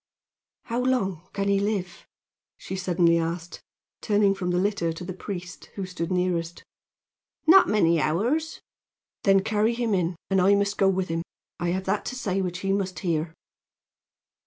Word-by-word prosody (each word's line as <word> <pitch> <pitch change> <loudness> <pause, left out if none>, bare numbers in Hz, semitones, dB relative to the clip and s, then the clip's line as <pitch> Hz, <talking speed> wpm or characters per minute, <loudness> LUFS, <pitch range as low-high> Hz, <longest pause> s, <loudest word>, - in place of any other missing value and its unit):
How 235 +1 -2
long 195 -10 -1
can 200 0 -2
he 200 0 +3
live?" 200 -3 -3 0.5
she 190 - -6
suddenly 175 -2 +2
asked, 170 +1 -4 0.4
turning 205 -2 +3
from 185 -2 -3
the 175 - +1
litter 190 -3 0
to 165 +2 -7
the 185 - -5
priest, 180 -1 -7
who 195 - -3
stood 180 -1 -4
nearest. 175 -2 -1 0.8
"Not 370 +4 +7
many 170 -6 +3
hours." 250 - 0 0.6
"Then 195 -1 +5
carry 220 +2 +1
him 235 -3 0
in, 180 -2 0 0.2
and 190 -1 +4
I 195 +2 +5
must 200 0 0
go 195 - +5
with 190 -1 -1
him. 165 0 -1 0.4
I 175 0 -1
have 185 +2 -1
that 200 +2 0
to - - -4
say 195 -6 -1
which 180 0 -3
he 195 0 0
must 190 -2 -2
hear." 165 -2 -2
190 Hz, 165 wpm, -25 LUFS, 175-200 Hz, 0.8 s, Not